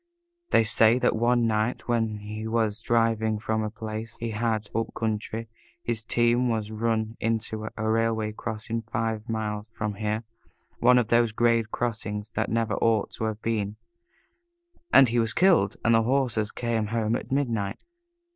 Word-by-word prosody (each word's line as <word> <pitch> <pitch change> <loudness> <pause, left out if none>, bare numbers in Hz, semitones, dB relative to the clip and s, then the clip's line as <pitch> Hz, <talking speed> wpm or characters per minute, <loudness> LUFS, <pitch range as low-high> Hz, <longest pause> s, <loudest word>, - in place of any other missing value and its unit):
They 115 - +5
say 110 +1 +4
that 125 -1 +2
one 120 +1 +2
night, 110 +2 0
when 115 -3 0
he 105 +1 -6
was 110 -1 0
driving 115 -2 +1
from 110 +1 -1
a 110 - -2
place 110 0 -6
he 115 -1 -4
had 110 -1 -1
up 115 +1 -2
country, 110 +1 -2 0.4
his 115 -2 -2
team 120 +2 +2
was 110 -2 -2
run 110 0 -1
into 110 -1 -2
at - - -6
a 110 - -2
railway 110 -1 +1
crossing 110 +1 -4
five 110 0 -3
miles 110 -1 -3
from 105 -2 -3
here 105 +2 -2 0.6
one 125 +1 +6
of 120 -4 +1
those 120 -1 +4
grade 115 -1 +2
crossings 110 -2 -3
that 110 0 -1
never 115 -1 0
ought 110 -2 +1
to 110 - -4
have 110 0 -4
been 105 -2 -1 1.2
and 135 -3 +7
he 120 +1 +1
was 115 -1 +1
killed 170 - +4
and 115 - +5
his 115 0 +4
horses 120 -4 +1
came 115 -3 -1
home 115 0 0
at 125 - -5
midnight. 115 -7 0
110 Hz, 165 wpm, -26 LUFS, 110-115 Hz, 1.2 s, and